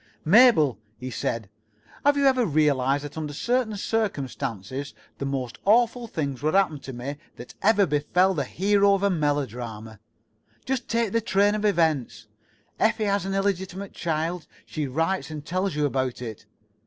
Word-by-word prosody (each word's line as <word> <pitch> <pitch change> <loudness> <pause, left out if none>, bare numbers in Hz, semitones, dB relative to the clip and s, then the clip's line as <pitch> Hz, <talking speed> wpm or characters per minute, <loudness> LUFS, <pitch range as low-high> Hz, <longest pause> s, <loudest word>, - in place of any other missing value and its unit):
He - - -31
did. - - -9
"Mabel," 210 - +6 0.2
he 130 +2 -6
said, 115 -2 -3 0.6
"have 285 0 +4
you 280 - +2
ever 260 -2 +4
realized 145 - +2
that 145 +2 -7
under 150 -2 -4
certain 235 - 0
circumstances 140 - -3 0.2
the 140 - -2
most 130 -3 -4
awful 235 +3 +3
things 140 - -3
would 155 +4 0
happen 185 -7 +2
to 135 - -8
me 130 +3 -6 0.2
that 120 - -11
ever 205 -1 +4
befell 180 +5 +2
the 145 -6 -1
hero 200 +6 +3
of 195 - -3
a 200 - +3
melodrama? 120 - -3 0.7
Just 260 -2 -2
take 230 -3 0
the 230 - +1
train 205 -2 +2
of 215 0 -1
events. 160 - +1 0.5
Effie 220 0 +2
has 200 -1 0
an 195 - -2
illegitimate 195 0 -2
child. 165 0 -2 0.2
She 150 -2 -3
writes 165 +9 -1
and 155 -2 -7
tells 185 0 -1
you 150 -1 +1
about 130 -3 -1
it." 110 -3 -8
160 Hz, 165 wpm, -25 LUFS, 140-200 Hz, 0.7 s, Mabel